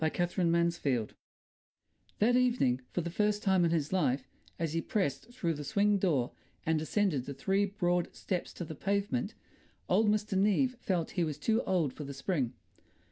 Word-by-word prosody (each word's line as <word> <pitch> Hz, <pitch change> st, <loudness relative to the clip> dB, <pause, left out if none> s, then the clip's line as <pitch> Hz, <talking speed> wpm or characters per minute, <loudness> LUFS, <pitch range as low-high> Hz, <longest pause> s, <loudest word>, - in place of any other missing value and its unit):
what? 160 Hz, 0 st, 0 dB
An 175 Hz, 0 st, +1 dB
Ideal 170 Hz, 0 st, +4 dB
Family 125 Hz, -6 st, 0 dB, 1.1 s
That 235 Hz, +4 st, +3 dB
evening 240 Hz, -, +2 dB
for 175 Hz, -, -2 dB
the 170 Hz, +1 st, -4 dB
first 210 Hz, +2 st, +1 dB
time 190 Hz, -3 st, +3 dB
in 170 Hz, -, +3 dB
his 160 Hz, -1 st, 0 dB
life, 135 Hz, -8 st, +1 dB, 0.3 s
as 165 Hz, -2 st, -2 dB
he 165 Hz, -, 0 dB
pressed 195 Hz, -, -1 dB
through 185 Hz, -10 st, -1 dB
the 150 Hz, -1 st, -6 dB
swing 200 Hz, +7 st, +2 dB
door 145 Hz, -10 st, +1 dB, 0.3 s
and 160 Hz, -1 st, +2 dB
descended 160 Hz, -4 st, 0 dB
the 140 Hz, -, -5 dB
three 195 Hz, +9 st, +1 dB
broad 180 Hz, -3 st, 0 dB
steps 180 Hz, -2 st, -3 dB
to 175 Hz, -, -5 dB
the 160 Hz, -, -6 dB
pavement, 195 Hz, -5 st, -1 dB, 0.5 s
old 210 Hz, +4 st, +3 dB
Mr. 210 Hz, -1 st, 0 dB
Neave 210 Hz, +7 st, +3 dB
felt 180 Hz, -7 st, -1 dB
he 180 Hz, -, 0 dB
was 155 Hz, -3 st, -2 dB
too 220 Hz, +9 st, +1 dB
old 175 Hz, -8 st, +1 dB
for 150 Hz, -, -7 dB
the 140 Hz, -1 st, -7 dB
spring. 135 Hz, -4 st, -1 dB
175 Hz, 185 wpm, -31 LUFS, 150-205 Hz, 1.1 s, Ideal